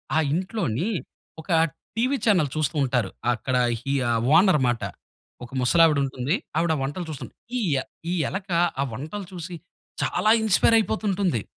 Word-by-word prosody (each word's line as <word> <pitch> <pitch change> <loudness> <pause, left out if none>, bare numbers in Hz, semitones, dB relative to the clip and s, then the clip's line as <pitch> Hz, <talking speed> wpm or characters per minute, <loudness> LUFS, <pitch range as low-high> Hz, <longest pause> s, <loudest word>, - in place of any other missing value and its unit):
ఆ - - +4 0.2
ఇంట్లోని 185 - -1 0.5
ఒక 160 - -21 0.5
టీవీ 255 +4 +1
చానెల్ 180 - +3
చూస్తూ 155 0 -1
ఉంటారు 125 -6 0 0.2
అక్కడ 125 +2 -2 0.3
హి 140 +2 -2 0.2
ఆ - - +2 0.3
ఓనర్ 185 -5 +5
మాట. 120 -2 0 0.6
ఒక 120 - -10
ముసలావిడుంటుంది. 140 -1 +3 0.2
ఆవిడ 165 -1 +2
వంటలు 145 +6 -3
చూస్తుంది. 150 - -7 0.2
ఈ - - 0 0.2
య - - +2 0.3
ఈ - - 0 0.2
ఎలుక 190 0 -5 0.3
ఆ - - +3
వంటలు 160 - -6
చూసి, 175 0 -7 0.5
చాలా 215 - +2
ఇన్‌స్పైరయిపోతుంటుంది. 205 - +2
165 Hz, 135 wpm, -24 LUFS, 135-195 Hz, 0.6 s, ఓనర్